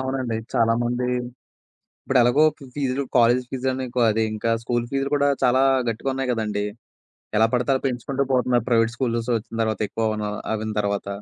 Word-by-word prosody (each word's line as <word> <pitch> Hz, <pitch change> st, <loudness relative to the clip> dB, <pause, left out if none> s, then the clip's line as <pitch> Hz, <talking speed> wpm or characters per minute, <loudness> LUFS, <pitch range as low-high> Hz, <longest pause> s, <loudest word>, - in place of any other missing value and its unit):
అవునండి. 130 Hz, -3 st, -2 dB, 0.2 s
చాలామంది. 120 Hz, +2 st, +1 dB, 1.0 s
ఇప్పుడెలాగో 130 Hz, +3 st, +4 dB, 0.3 s
ఫీజులు 140 Hz, -1 st, -1 dB
కాలేజీ 120 Hz, +1 st, +4 dB
ఫీజని 130 Hz, 0 st, -2 dB
కా -, -, +3 dB
అదింకా 110 Hz, +1 st, -1 dB
స్కూలు 120 Hz, 0 st, -1 dB
ఫీజులు 135 Hz, 0 st, -1 dB
కూడా 145 Hz, 0 st, +2 dB
చాలా 130 Hz, +1 st, +4 dB, 0.3 s
గట్టిగున్నాయి 130 Hz, +3 st, -2 dB
గదండీ! 105 Hz, -3 st, -2 dB, 0.7 s
ఎలా 110 Hz, -, +5 dB
పడతే 125 Hz, +2 st, +2 dB
పెంచుకుంటూ 135 Hz, +2 st, -1 dB
పోతున్నారు 125 Hz, -2 st, +2 dB
ప్రైవేట్ 115 Hz, -1 st, +3 dB
స్కూల్స్ 120 Hz, -2 st, -1 dB
వచ్చిన 115 Hz, +1 st, -5 dB
తర్వాత 110 Hz, -1 st, -2 dB
ఎక్కువ 110 Hz, +1 st, -1 dB
అవున 105 Hz, -1 st, -2 dB, 0.3 s
అవ్విన 110 Hz, 0 st, -3 dB
తర్వాత. 100 Hz, -1 st, -1 dB
120 Hz, 140 wpm, -23 LUFS, 115-130 Hz, 1.0 s, ఎలా